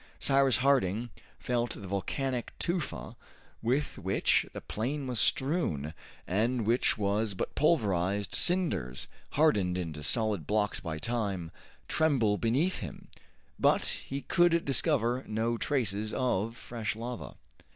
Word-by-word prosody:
Cyrus 135 -2 +3
Harding 120 -4 +2 0.3
felt 120 -1 -1
the 100 - -8
volcanic 125 +6 -2
tufa 170 -1 -3 0.5
with 130 +6 0
which - - +2
the - - -6
plain 135 +6 -3
was 125 -3 0
strewn, 120 - +1 0.3
and 115 +5 +1
which 115 +1 +2
was 105 0 0
but - - -3
pulverized 100 - +1
cinders 170 - 0 0.3
hardened 105 - +3
into 80 -4 -4
solid 105 - 0
blocks 105 0 +1
by 80 -3 -4
time, 100 -5 -2 0.4
tremble 125 -10 +2
beneath 140 +11 +1
him, 85 -9 -8 0.5
but - - +4 0.2
he 140 +1 -3
could 175 -2 +3
discover 130 -3 +2
no 110 +2 0
traces 110 -5 -1
of 115 -3 0
fresh 115 -3 -4
lava. 120 +2 -6
115 Hz, 120 wpm, -30 LUFS, 100-135 Hz, 0.5 s, but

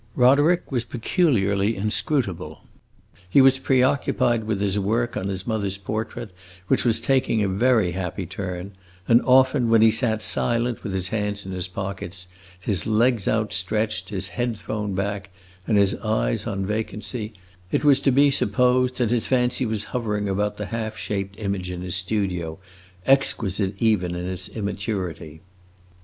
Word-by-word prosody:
Roderick 145 +8 +4
was 125 -3 0
peculiarly 115 - +1
inscrutable. 110 - -1 0.7
He 100 - +5
was 135 0 +6
preoccupied 130 -3 +2
with 110 -2 -1
his 100 0 0
work 115 +4 0
on 95 - -2
his 95 -1 -4
mother's 100 -4 -2
portrait, 110 +2 -5 0.4
which - - +2
was 115 -2 +3
taking 130 -3 +1
a - - +1
very 110 -1 +2
happy 90 +1 -4
turn; 90 0 -5 0.4
and 120 +1 +5
often, 130 -1 +4
when 115 -1 +5
he 110 - +6
sat 110 -1 +1
silent, 120 0 +1
with 105 - -4
his 95 -1 -1
hands 105 -2 -2
in 95 - -6
his 90 -1 +1
pockets, 95 -1 -5 0.3
his 90 0 -1
legs 115 -1 +2
outstretched, 105 -2 -1
his 95 -2 -3
head 115 +5 -2
thrown 105 -1 -4
back, 100 0 -3 0.4
and 110 - +3
his 100 -1 +4
eyes - - -1
on 95 -1 -2
vacancy, 105 +1 -4 0.4
it - - 0
was 140 -2 +5
to 140 - +2
be 140 +2 +4
supposed 125 +2 +2
that 120 -3 +1
his 120 -2 +1
fancy 125 0 +1
was 110 -2 -1
hovering 105 -4 -1
about 105 +2 -1
the 105 - -4
half 110 -2 -3
shaped 100 +1 -4
image 100 -3 -3
in 90 0 -5
his 90 0 -3
studio, 90 -4 -2 0.5
exquisite 105 -8 +1
even 95 -6 +1
in 90 0 -4
its 90 -1 -3
immaturity. 95 -6 -4
105 Hz, 155 wpm, -23 LUFS, 95-120 Hz, 0.7 s, was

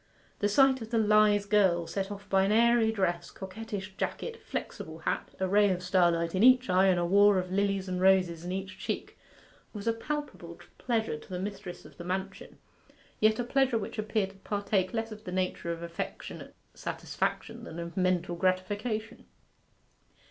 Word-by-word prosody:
The 205 - +1
sight 265 +3 +4
of 225 - -7
the 230 - 0
lithe 210 -1 +4
girl, 190 -5 +3
set 195 +2 -3
off 200 0 -8
by 195 0 +3
an 195 +2 +2
airy 230 0 +4
dress, 175 -5 -1
coquettish 205 0 -7
jacket, 460 -1 -4
flexible - - -6
hat, - - -2
a 190 - +1
ray 205 +2 +4
of 180 -1 -1
starlight 170 -2 +2
in 190 - +1
each 255 -1 +6
eye 185 +1 +5
and 180 -2 +3
a 175 - +1
war 200 +2 +5
of 180 0 -2
lilies 195 0 0
and 180 0 -2
roses 185 -3 +3
in 180 - -4
each 190 0 -5
cheek, - - -4 0.6
was 205 -2 -7
a 230 - +2
palpable 230 - -5 0.2
pleasure 220 -10 -1
to - - -16
the 185 - -4
mistress 190 -2 -6
of - - -15
the 175 - -7
mansion, 190 +2 -5 0.6
yet 215 0 +4
a 245 - -1
pleasure 265 0 +2
which 215 0 -5
appeared 210 -2 -1
to - - -20
partake 200 -1 -1
less 225 -1 -3
of 215 0 -9
the 180 - -6
nature 185 -2 -2
of 170 0 -5
affectionate 170 0 -6 0.2
satisfaction - - -3
than 160 - -8
of 170 0 -6
mental 180 -1 +1
gratification. 205 +5 -2
195 Hz, 180 wpm, -29 LUFS, 185-215 Hz, 0.6 s, each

